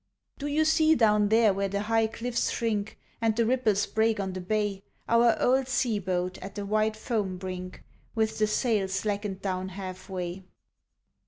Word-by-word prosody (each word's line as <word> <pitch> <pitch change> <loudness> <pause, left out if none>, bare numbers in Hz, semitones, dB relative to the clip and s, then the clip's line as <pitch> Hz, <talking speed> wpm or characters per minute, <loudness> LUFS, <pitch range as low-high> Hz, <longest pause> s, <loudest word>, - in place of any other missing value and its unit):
Do 290 - -3
you 305 +2 +2
see 315 0 +4
down 210 -4 +3
there 220 -2 +5
where 195 +1 -1
the 200 +1 -2
high 225 +1 +2
cliffs 235 +2 -2
shrink, 215 -3 -2 0.2
And 225 -1 +2
the 230 0 +2
ripples 225 -4 +2
break 220 0 +1
on 190 -1 -2
the 185 - -5
bay, 205 0 -1 0.3
Our 235 0 +4
old 260 +1 +2
sea 240 -4 0
boat 180 -1 -2
at 195 0 -9
the 205 -1 -4
white 215 +1 +1
foam 215 -4 -2
brink 185 0 -7 0.3
With 220 -1 0
the 215 - +3
sail 215 -3 +1
slackened 200 0 -3
down 185 -1 -2
half 185 0 -8
way? 180 0 -4
210 Hz, 175 wpm, -28 LUFS, 190-225 Hz, 0.3 s, there